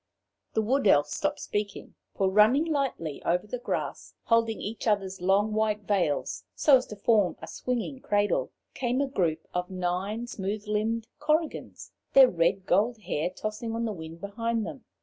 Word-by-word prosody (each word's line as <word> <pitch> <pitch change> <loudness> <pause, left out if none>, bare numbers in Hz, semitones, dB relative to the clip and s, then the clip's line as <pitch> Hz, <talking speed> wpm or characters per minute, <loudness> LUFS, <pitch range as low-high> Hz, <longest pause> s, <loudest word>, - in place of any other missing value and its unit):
The 220 - +2
Wood 260 +2 +2
Elf 145 -6 +6
stopped - - -1
speaking, 205 -1 -4 0.2
for 195 - +2
running 215 +10 +5
lightly 275 - -2
over 180 +3 +1
the 245 +4 -5
grass, 245 - -4
holding 230 -1 +2
each 220 +3 -5
other's 195 -3 0
long 200 +4 +2
white 215 -1 +1
veils 185 -8 0
so 280 -3 +6
as 255 - -5
to 210 - -7
form 205 -2 +2
a - - -7
swinging 250 +2 -3
cradle, 205 - +1 0.2
came 250 0 -1
a 280 - +1
group 170 - -1
of 180 0 -2
nine 185 +5 -2
smooth 210 -1 -4
limbed 220 +2 0
Korrigans, 305 +1 -1 0.2
their 270 -1 +9
red 180 +3 +1
gold 215 +7 +2
hair 175 -3 -1
tossing 215 +4 -4
on 230 0 -1
the 220 - -2
wind 165 -2 -9
behind 225 +2 -2
them. 260 - -8
210 Hz, 170 wpm, -28 LUFS, 190-235 Hz, 0.2 s, their